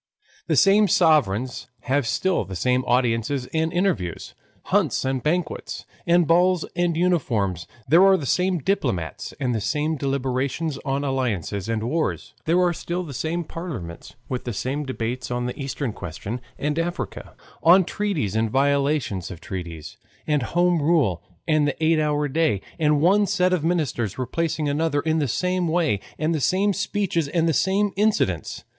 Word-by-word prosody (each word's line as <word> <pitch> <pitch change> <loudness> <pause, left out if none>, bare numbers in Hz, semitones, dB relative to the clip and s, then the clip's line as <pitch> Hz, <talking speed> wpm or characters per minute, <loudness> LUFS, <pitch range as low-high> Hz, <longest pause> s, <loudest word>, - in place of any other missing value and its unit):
The - - +2
same 205 +2 +5
sovereigns 130 - +2
have 135 -1 0
still 185 +10 +1
the 95 - -8
same 125 +6 +1
audiences 125 +1 +1
and 160 0 +1
interviews, 170 - -1 0.3
hunts - - +1
and 130 -1 -1
banquets, 170 +5 -2 0.2
and 170 0 +4
balls 175 +2 +3
and 175 -2 +1
uniforms; 115 - 0 0.2
there 170 +4 +6
are 190 -1 +6
the 145 - -5
same 180 +6 +1
diplomats 130 - -2
and 125 -3 0
the 110 - -1
same 150 +8 -1
deliberations 135 +2 -1
on 135 +1 -1
alliances 115 - -2
and 110 -1 -1
wars; 155 +7 -2
there 170 +3 +3
are 180 -1 +3
still 175 +2 -3
the 150 -5 -8
same 160 +6 -2
parliaments, 130 - -7
with 125 -1 -3
the 120 - -4
same 135 +7 -3
debates 125 0 -3
on 120 0 -2
the 125 +3 -5
Eastern 135 -3 -3
question 100 +8 -6 0.2
and 150 +2 -1
Africa, 165 - -4 0.3
on 180 +3 +7
treaties 165 - -2
and 110 0 +1
violations 140 - +1
of 90 - -8
treaties, 85 -4 -7 0.3
and 150 -2 +1 0.2
Home 175 -2 +3
Rule 145 - +2 0.3
and 155 -2 +3
the 145 - -2
eight 160 0 +4
hour 150 -1 +1
day; 145 - +1 0.2
and 150 -2 +3
one 200 +5 +4
set 180 0 +2
of 175 -4 0
ministers 145 - -1
replacing 155 +4 -1
another 145 0 0
in 160 +1 0
the 145 - +1
same 180 +7 0
way, 160 - +1 0.2
and 155 +2 0
the 155 - -1
same 195 +7 +2
speeches 195 -5 -1
and 165 +3 +1
the 165 - +2
same 195 +5 +2
incidents. 195 - 0
150 Hz, 165 wpm, -23 LUFS, 125-170 Hz, 0.3 s, on